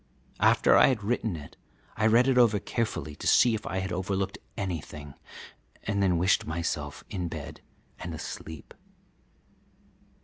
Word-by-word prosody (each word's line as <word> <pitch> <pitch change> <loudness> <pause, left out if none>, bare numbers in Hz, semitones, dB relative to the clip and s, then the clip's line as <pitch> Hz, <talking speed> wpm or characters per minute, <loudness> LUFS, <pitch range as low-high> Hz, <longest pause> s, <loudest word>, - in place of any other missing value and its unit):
After - - +5
I - - +7
had 125 -6 0
written 110 -2 -1
it 75 -2 -10 0.4
I 110 - +2
read 120 +4 +5
it 135 - +3
over 115 -4 +5
carefully 100 - -3
to - - -4
see 120 - +5
if 110 - -4
I 95 - -3
had 95 0 -4
overlooked 95 +2 -2 0.2
anything, 75 -6 -5 0.7
and 100 -1 -1
then 90 -3 +3
wished 90 +4 +2
myself 80 -3 -3
in 90 -3 -2
bed - - -7 0.4
and - - -5
asleep. 80 -3 -8
95 Hz, 145 wpm, -28 LUFS, 80-110 Hz, 0.7 s, I